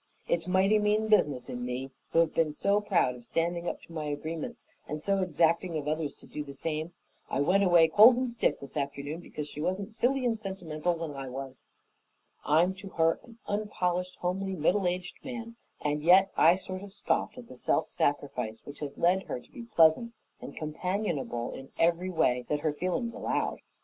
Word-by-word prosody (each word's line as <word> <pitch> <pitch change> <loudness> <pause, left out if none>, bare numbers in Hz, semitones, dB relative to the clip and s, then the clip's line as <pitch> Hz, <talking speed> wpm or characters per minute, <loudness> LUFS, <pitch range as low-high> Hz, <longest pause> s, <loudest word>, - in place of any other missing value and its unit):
It's 170 0 0
mighty 190 +3 +4
mean 210 +1 +1
business 145 -12 +3
in 125 0 -5
me, 125 +2 -4 0.2
who 165 - +5
have 165 - +1
been 155 -2 +1
so 200 +6 +2
proud 180 -11 +2
of 125 -1 -12
standing 170 +5 -1
up - - -7
to 170 - -14
my 155 -2 -3
agreements 155 +2 -5 0.2
and 150 +1 -4
so 195 +5 +1
exacting 170 0 +1
of 150 -1 -4
others 155 -1 -1
to - - -16
do 150 - -5
the 140 -1 -9
same. 160 +3 -3 0.4
I - - -1
went 185 +7 +3
away 175 -3 +6
cold 215 +9 +8
and 255 -1 -1
stiff 235 - 0
this 140 - -9
afternoon 140 +2 -3
because 150 -3 -6
she 150 - -7
wasn't 195 +5 -2
silly 250 +3 +1
and 225 -2 +1
sentimental 175 -4 -2
when 165 -2 -4
I 135 -2 -6
was. 135 0 -7 0.8
I'm 165 +5 +3
to 195 0 -9
her 165 0 +3
an 230 -2 -15
unpolished, 185 -3 -1
homely, 190 +2 -1
middle 180 +4 +2
aged 180 +1 -4
man, 235 -3 -6 0.3
and 150 0 0
yet 185 +4 +6
I 170 +2 +6
sort 185 0 -6
of 200 -1 -10
scoffed - - -1
at - - -10
the - - -11
self - - +1
sacrifice 125 -6 -2
which 145 0 -10
has 145 -2 -6
led 180 +2 +2
her - - -3
to - - -20
be 240 - -9
pleasant 215 +3 +4 0.3
and - - -9
companionable 155 - -2
in 135 0 -9
every 175 +2 +2
way 125 -8 +2
that 150 -1 0
her 155 -1 0
feelings 185 +9 -2
allowed. - - -1
170 Hz, 195 wpm, -29 LUFS, 150-195 Hz, 0.8 s, cold